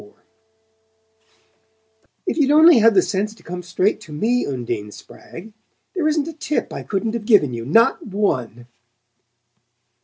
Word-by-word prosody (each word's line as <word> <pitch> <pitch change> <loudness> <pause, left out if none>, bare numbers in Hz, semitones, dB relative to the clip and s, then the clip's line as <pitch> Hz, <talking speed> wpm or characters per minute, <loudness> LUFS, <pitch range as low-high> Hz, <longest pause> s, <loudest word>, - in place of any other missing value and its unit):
XXIV 105 - -18 2.1
"If - - -2
you'd 280 -2 +2
only 315 -1 +7
had 225 -1 +4
the 185 - +5
sense 210 +2 -3
to - - -21
come 180 +1 -7
straight 180 +3 -1
to 165 - -13
me, 230 +11 -1
Undine 120 -6 -4
Spragg! 195 - -13 0.4
There 350 -6 -1
isn't 305 -1 0
a 330 - -6
tip 305 -1 -3
I - - -6
couldn't 215 +2 -3
have 235 -3 -5
given 195 - +3
you 115 -1 -6
not 230 +11 +2
one!" 130 - -2
210 Hz, 150 wpm, -20 LUFS, 150-240 Hz, 2.1 s, only